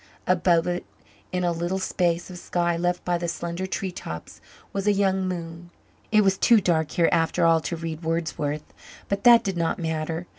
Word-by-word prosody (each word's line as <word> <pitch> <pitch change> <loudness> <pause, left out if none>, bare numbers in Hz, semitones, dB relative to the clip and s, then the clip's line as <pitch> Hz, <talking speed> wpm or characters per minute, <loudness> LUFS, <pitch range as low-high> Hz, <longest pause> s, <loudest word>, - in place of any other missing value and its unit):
Above 175 -2 +3
it, 175 0 -2 0.5
in 180 0 -1
a 175 - +2
little 175 +3 -2
space 175 -2 -1
of 180 - -8
sky 175 -1 0
left 175 +1 -1
by 175 -1 0
the 170 - -2
slender 170 +2 -4
tree 190 0 -3
tops, 80 - -8 0.3
was 195 +1 -2
a - - +6
young 190 -1 +1
moon. 170 -1 -6 0.4
It 215 -1 +5
was 195 -1 +2
too 235 -3 +6
dark 160 -5 +1
here 170 +1 +2
after 165 0 +2
all 165 -1 +4
to 170 - -3
read 165 -1 -5
Wordsworth, 160 -3 -2 0.5
but 200 +3 -2
that 235 -1 +8
did 195 -3 -2
not 165 -1 0
matter. 160 +1 -3
175 Hz, 190 wpm, -25 LUFS, 165-185 Hz, 0.5 s, that